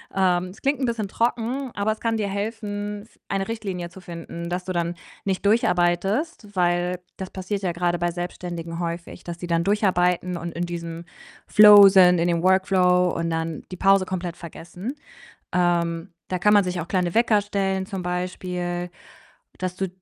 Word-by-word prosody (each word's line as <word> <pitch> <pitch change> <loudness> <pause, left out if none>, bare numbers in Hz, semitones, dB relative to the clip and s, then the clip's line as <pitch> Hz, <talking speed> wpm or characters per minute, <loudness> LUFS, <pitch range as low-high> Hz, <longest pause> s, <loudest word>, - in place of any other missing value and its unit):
Ähm, 180 -2 +2
es 185 +4 -12
klingt 275 0 +1
'n 260 - 0
bisschen 225 -4 -2
trocken, 240 +3 -1
aber 205 +2 0
es 215 - -4
kann 230 -1 0
dir 205 -2 -1
helfen, 205 0 -4
f 225 - -23
eine 195 +2 -1
Richtlinie 190 -6 -4
zu 190 - -13
finden, 170 0 -7
dass 180 +1 -2
du 185 - -4
dann 170 0 -1 0.3
nicht 195 0 -2
durcharbeitest, 205 - +1
weil 175 0 +1 0.2
das 190 -1 -6
passiert 195 +2 -4
ja 175 -2 0
grade 175 0 0
bei 175 0 0
Selbstständigen 175 -1 -5
häufig, 170 0 -5
dass 175 0 -6
sie 175 - -4
dann 170 0 +1
durcharbeiten 180 -3 +1
und 170 0 -6
in 175 +1 -2
diesem 170 -1 -6 0.4
Flow 205 -1 +9
sind, 180 -2 +6
in 170 - +2
dem 170 -1 +1
Workflow 185 -1 +3
und 165 0 -2
dann 160 -1 -3
die 185 - -6
Pause 195 -1 +4
komplett 180 -2 -4
vergessen. 175 - -7 0.6
Ähm, 170 0 +1 0.2
da 185 - -1
kann 210 +3 +4
man 205 -1 +6
sich 180 -1 -3
auch 165 - -7
kleine 180 -1 -1
Wecker 225 -3 +4
stellen 195 -2 -1
zum 195 -3 -5
Beispiel, 180 0 -3 0.7
dass 185 -1 -3
du 190 0 -2
180 Hz, 180 wpm, -24 LUFS, 175-200 Hz, 0.7 s, Flow